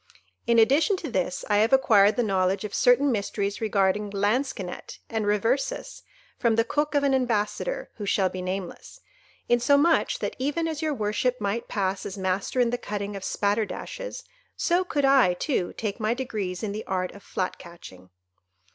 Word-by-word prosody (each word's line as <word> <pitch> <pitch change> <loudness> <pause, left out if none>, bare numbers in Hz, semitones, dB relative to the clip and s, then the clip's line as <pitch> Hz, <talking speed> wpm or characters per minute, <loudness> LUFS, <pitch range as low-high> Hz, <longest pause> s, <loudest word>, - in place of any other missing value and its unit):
"In 235 - +4
addition 280 - +4
to 310 -7 -6
this, 180 -4 -2
I 205 - +2
have 220 +2 +3
acquired 210 -6 +5
the 245 - +1
knowledge 190 -1 +1
of 210 - -6
certain 260 +3 +4
mysteries 200 -2 -2
regarding 205 -1 +1
Lansquenet 205 -1 -2
and 220 -2 -1
Reversis, 230 - -1 0.4
from 235 -3 +2
the 230 - +3
cook 295 +5 -1
of 285 - +3
an 275 -1 +2
ambassador 255 - -1
who 205 -2 -5
shall 195 -1 +2
be 185 0 -5
nameless,—insomuch 280 - 0
that, - - -4
even 295 +5 -1
as 315 -1 -4
your 310 -2 -1
worship 220 +3 -1
might 210 +3 -2
pass 195 -1 -1
as 195 - -7
master 190 +6 -1
in 240 -1 +3
the 245 - -2
cutting 205 -2 -4
of 195 - -7
spatterdashes, 225 - -2 0.3
so 355 +1 +2
could 290 -6 0
I, 265 -10 +5
too, 185 - -1
take 210 -1 -4
my 220 +2 0
degrees 210 -8 -4
in 210 - -2
the 215 +2 -5
art 185 -1 -1
of 200 - -13
flat 185 -1 -3
catching. 130 - -13
220 Hz, 170 wpm, -26 LUFS, 195-270 Hz, 0.4 s, acquired